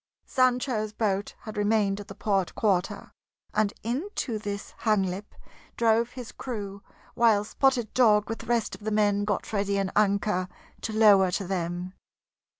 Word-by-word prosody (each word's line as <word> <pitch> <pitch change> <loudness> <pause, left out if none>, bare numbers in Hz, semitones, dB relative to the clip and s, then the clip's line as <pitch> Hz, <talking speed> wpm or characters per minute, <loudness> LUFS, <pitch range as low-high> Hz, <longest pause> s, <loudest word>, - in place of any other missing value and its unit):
Sancho's 250 -4 +1
boat 205 -2 -1
had 215 - -8
remained 205 -1 +2
at 205 - -9
the 195 - -9
port 195 -3 0
quarter, 195 -5 0 0.4
and 215 -1 +2
into 250 - -3
this 205 -1 -5
Hanglip 200 -2 0 0.4
drove 230 +1 +2
his 250 -2 -8
crew 200 -5 -6 0.3
while 225 -4 +4
Spotted 245 0 +1
Dog 210 -4 +4
with 225 - -4
the 230 - -10
rest 235 -2 0
of - - -9
the 215 - -1
men 205 -1 +2
got 205 +1 -2
ready 200 -1 0
an 195 -1 -1
anchor 200 -2 +1 0.3
to 225 - -3
lower 205 -4 +6
to 195 +2 -2
them. 180 0 -3
210 Hz, 150 wpm, -27 LUFS, 200-225 Hz, 0.4 s, lower